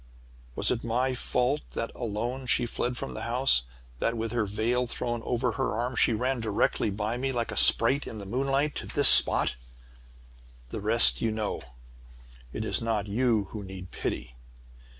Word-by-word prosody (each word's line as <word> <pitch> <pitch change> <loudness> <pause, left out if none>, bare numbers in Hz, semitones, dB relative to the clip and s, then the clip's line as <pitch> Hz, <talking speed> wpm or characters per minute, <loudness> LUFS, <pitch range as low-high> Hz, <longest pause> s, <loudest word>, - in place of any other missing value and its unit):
"Was - - +2
it 120 - -3
my 125 +3 -1
fault 125 +3 -1
that, 115 - -4
alone, 120 +3 -5
she 120 - +2
fled 120 +1 -3
from - - -6
the - - -7
house? 120 - +2 0.3
That, 115 - -1
with 115 0 -4
her 120 -3 -1
veil 115 +5 -1
thrown 120 0 -4
over 120 +1 -2
her 105 - -3
arm, 120 +2 -3
she - - +2
ran 125 +3 -2
directly 110 -1 -1
by 105 +4 -4
me, 135 +2 -2
like 120 -2 -3
a - - -6
sprite 130 +5 +3
in 110 - -8
the 100 - -9
moonlight, 135 +6 -1
to - - -6
this 145 -2 +7
spot? - - +6 1.2
"The - - -6
rest 60 0 +7
you 115 - 0
know. 110 -1 -4 0.9
"It - - -5
is - - 0
not 110 -3 -2
you 110 0 0
who 105 -2 -7
need 95 -2 -10
pity! - - -5
115 Hz, 175 wpm, -26 LUFS, 105-125 Hz, 1.2 s, this